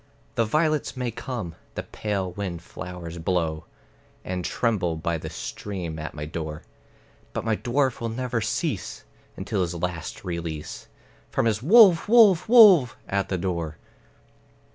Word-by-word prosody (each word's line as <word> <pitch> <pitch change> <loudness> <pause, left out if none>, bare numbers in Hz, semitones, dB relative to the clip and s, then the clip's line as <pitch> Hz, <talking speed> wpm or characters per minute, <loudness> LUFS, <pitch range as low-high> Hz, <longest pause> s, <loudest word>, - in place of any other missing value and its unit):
The 115 - +1
violets 155 +3 0
may 125 -2 -2
come, 115 -7 -5 0.2
the - - -3
pale 100 -4 -3
wind 90 -3 -5
flowers 90 -2 -8
blow, 80 -2 -1 0.6
And 90 -1 -3
tremble 100 -6 0
by 80 +1 -2
the - - -6
stream 90 -6 -6
at 80 0 -6
my 75 0 -5
door; 80 0 -5 0.7
But - - -3
my 110 -1 +2
dwarf 130 +3 0
will 115 - -2
never 125 0 -2
cease, 110 - -3 0.3
until - - -2
his 90 -1 -2
last 85 -1 -4
release, 85 -4 -5 0.4
From - - 0
his 110 -2 +1
"Wolf, 190 - +6
wolf, 215 -5 +6
wolf!" 195 - +7
at 100 0 -1
the 95 - 0
door. 85 -4 -3
95 Hz, 140 wpm, -25 LUFS, 85-125 Hz, 0.7 s, wolf